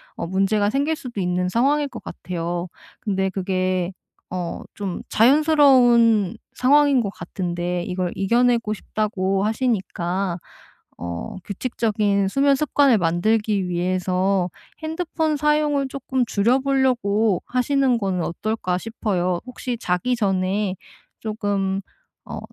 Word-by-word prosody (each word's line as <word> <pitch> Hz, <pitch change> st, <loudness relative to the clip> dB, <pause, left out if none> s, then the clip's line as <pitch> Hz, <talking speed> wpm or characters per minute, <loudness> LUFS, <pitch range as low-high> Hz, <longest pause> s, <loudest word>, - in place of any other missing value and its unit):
어 -, -, -4 dB
문제가 195 Hz, +3 st, +1 dB
생길 285 Hz, +5 st, +1 dB
수도 245 Hz, -8 st, -7 dB
있는 180 Hz, 0 st, 0 dB
상황일 280 Hz, +7 st, +2 dB
것 235 Hz, -4 st, -9 dB
같아요. 175 Hz, 0 st, -4 dB, 0.3 s
근데 190 Hz, -2 st, 0 dB
그게 185 Hz, -1 st, -1 dB, 0.4 s
어 180 Hz, -2 st, -4 dB
좀 195 Hz, -4 st, -4 dB
자연스러운 245 Hz, -, +5 dB, 0.2 s
상황인 280 Hz, 0 st, +4 dB
것 200 Hz, -4 st, -3 dB
같은데 175 Hz, -2 st, -3 dB
이걸 180 Hz, -1 st, -2 dB
"이겨내고 235 Hz, +2 st, +2 dB
싶다."고 195 Hz, -2 st, -1 dB
하시니까 195 Hz, -6 st, -1 dB, 0.6 s
어 85 Hz, -, -5 dB
규칙적인 205 Hz, -2 st, 0 dB
수면 275 Hz, +4 st, +3 dB
습관을 280 Hz, -4 st, +3 dB
만들기 200 Hz, +3 st, +1 dB
위해서 185 Hz, +1 st, 0 dB, 0.3 s
핸드폰 315 Hz, -1 st, -1 dB
사용을 300 Hz, -2 st, +2 dB
쪼끔 265 Hz, -1 st, -1 dB
줄여 230 Hz, +5 st, +2 dB
보려고 240 Hz, -7 st, +1 dB
하시는 255 Hz, 0 st, +2 dB
거는 185 Hz, -4 st, -1 dB
어떨까 185 Hz, 0 st, -2 dB
싶어요. 185 Hz, -6 st, -1 dB
혹시 250 Hz, -1 st, -5 dB
자기 180 Hz, +8 st, 0 dB
전에 195 Hz, -2 st, 0 dB, 0.5 s
쪼금 200 Hz, -3 st, -1 dB, 0.4 s
어 -, -, -6 dB
210 Hz, 260 characters per minute, -22 LUFS, 185-250 Hz, 0.6 s, 자연스러운